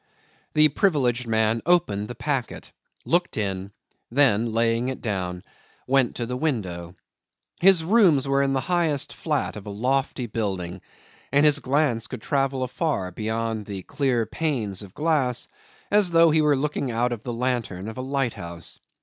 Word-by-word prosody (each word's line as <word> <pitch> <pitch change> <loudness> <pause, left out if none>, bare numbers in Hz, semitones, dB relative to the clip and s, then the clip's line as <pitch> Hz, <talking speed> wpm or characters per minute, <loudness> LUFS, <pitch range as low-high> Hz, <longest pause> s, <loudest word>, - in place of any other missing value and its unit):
The 155 0 +6
privileged 130 - +1
man 110 0 +1
opened 105 - +2
the 120 - -7
packet, 125 +1 -3 0.3
looked 175 +1 0
in, 95 -2 -3 0.4
then, 120 -4 +3
laying 115 +2 +1
it 130 - -5
down, 90 -5 -3 0.4
went 130 -1 +2
to 120 - -3
the 125 +2 -4
window. 95 - -3 0.6
His 185 -2 +5
rooms 170 - +4
were 140 0 +2
in 135 0 +1
the 135 - +1
highest 165 -5 0
flat - - -2
of 105 -1 -9
a - - -4
lofty 130 +4 -1
building, 95 -5 -3 0.5
and 145 +2 +4
his 150 -1 +6
glance 130 -5 0
could 110 - -8
travel 135 -2 0
afar 125 - -2
beyond 110 +1 -3
the 100 -3 -6
clear 130 -3 0
panes 115 - -2
of 100 -2 -10
glass, 145 -6 0 0.4
as 205 -3 +4
though 165 -1 +5
he 155 0 +3
were 150 -1 +3
looking 140 -1 -2
out 120 +1 0
of 120 -3 -4
the 120 - -5
lantern 115 -6 -2
of 110 +3 -7
a - - -2
lighthouse. 120 -11 -3
125 Hz, 160 wpm, -24 LUFS, 110-145 Hz, 0.6 s, The